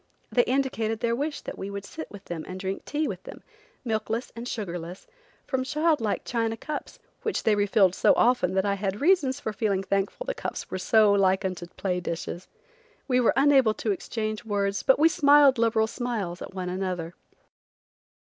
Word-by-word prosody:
They 245 - +5
indicated 240 -4 0
their 235 0 0
wish 290 +4 -3
that - - -8
we 195 - -4
should 200 0 -6
sit 315 - -8
with 205 -1 -12
them 165 -2 -5
and 185 0 -6
drink 190 0 -4
tea 300 +1 -1
with - - -5
them, - - -11 0.4
milkless 225 +1 -2
and 235 +1 -6
sugarless, 180 -5 -5 0.4
from 260 -1 -1
child 305 +1 +1
like 215 -2 -1
China 225 -1 -1
cups, 300 +5 -6 0.2
which 440 - -2
they 220 - +4
re 205 0 +1
filled 195 -3 +4
so - - +4
often 235 -7 +2
that 190 0 +2
I 200 - +2
had 200 0 -2
reasons 290 -5 +3
for 220 - -4
feeling 195 -2 0
thankful 195 - -1
the - - -2
cups - - -6
were 185 - -3
so 215 +1 +4
like 190 0 +3
unto 185 -2 -4
play 180 -2 -1
dishes. 175 +1 -5 0.6
We 250 -2 +3
were 240 - +3
unable 270 -6 +5
to 215 - -1
exchange 215 +2 -3
words, 200 -2 -1
but 265 - +4
we 310 +3 +6
smiled 285 -5 +5
liberal 225 -1 +3
smiles, 220 -7 -4
at - - -8
one 180 -1 -3
another. 180 -2 -3
220 Hz, 190 wpm, -26 LUFS, 190-260 Hz, 0.6 s, we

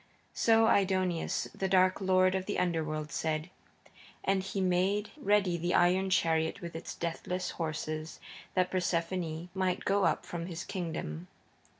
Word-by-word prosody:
So 225 0 +4
Aidoneus, 185 -4 +1
the 190 - -2
dark 185 0 +4
lord 185 -1 +4
of 190 0 -2
the 205 - -1
Underworld 155 -3 -1
said, 160 +2 -2 0.7
and 195 0 +2
he 195 +1 -4
made 190 +3 +1
ready 205 - +2
the 175 +1 0
iron 185 +2 +3
chariot 160 -2 +1
with 170 -3 -7
its 165 - -6
deathless 180 +2 -3
horses 155 -1 -4 0.4
that 185 0 +2
Persephone 170 -2 -1
might 185 -1 -1
go 200 0 +3
up - - +1
from 170 0 -5
his 170 -2 -5
kingdom. 90 - -4
180 Hz, 140 wpm, -31 LUFS, 165-190 Hz, 0.7 s, So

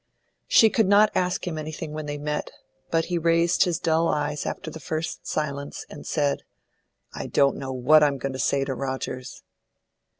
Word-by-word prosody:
She 220 -2 +6
could 220 -1 +2
not 205 +2 +5
ask 180 0 0
him 165 -3 -3
anything 155 0 -6
when 155 0 -5
they 145 0 -3
met, 150 +1 -3 0.4
but 165 0 +1
he 175 -1 -1
raised 170 +2 +3
his 175 -3 0
dull 165 -1 +1
eyes 150 -1 -1
after 160 - -5
the 160 - -8
first 160 -1 -4
silence, 140 -2 -3
and 145 - -9
said, 145 -2 0 0.7
"I - - -5
don't 140 -1 +3
know 135 -1 -5
what 130 +5 +5
I'm 145 -2 +3
going 135 +1 -4
to 130 - -6
say 140 0 +1
to 135 - -2
Rogers." 130 0 -5
155 Hz, 180 wpm, -25 LUFS, 140-165 Hz, 0.7 s, She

